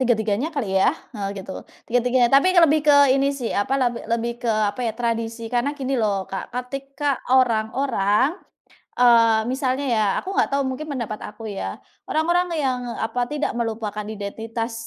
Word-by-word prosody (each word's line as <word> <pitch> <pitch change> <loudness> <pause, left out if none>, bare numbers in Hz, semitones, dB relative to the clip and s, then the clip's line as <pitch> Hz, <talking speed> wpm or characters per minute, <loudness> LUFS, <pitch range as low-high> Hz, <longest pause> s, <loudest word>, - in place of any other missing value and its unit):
tiga-tiganya 225 +1 +1
kali 230 -10 -2
ya? - - +5 0.2
Heeh, 205 -4 -4 0.2
gitu, 190 - -7 0.3
tiga-tiganya, 245 +1 +2
tapi 275 +6 +6
lebih 315 -3 +6
ke 290 - +7 0.2
ini 275 +1 +2
sih 270 -5 -3
apa, 205 +7 0
leb 250 -3 +1
lebih 235 +1 0
ke 240 - -3 0.2
apa 255 - -8
ya, - - -2
tradisi. 230 -1 -2
Karena 250 +4 0
gini 270 -1 -2
loh, 200 -3 0
Kak, 190 - -6
ketika 275 +2 -3
orang-orang 250 - +2 0.5
eee, 230 -2 +5
misalnya 265 +1 -1
ya, 220 -3 +2 0.2
aku 385 +1 -5
nggak - - +3
tahu, 280 - +2
mungkin 260 +4 -5
pendapat 235 -5 -4 0.2
aku 220 0 -8
ya, 200 - -5 0.2
orang-orang 345 +3 +1
yang 260 -2 0
apa 230 +2 -2
tidak 295 -2 -3
melupakan 220 -3 -3
identitas 225 +2 -5
245 Hz, 160 wpm, -22 LUFS, 220-275 Hz, 0.5 s, ke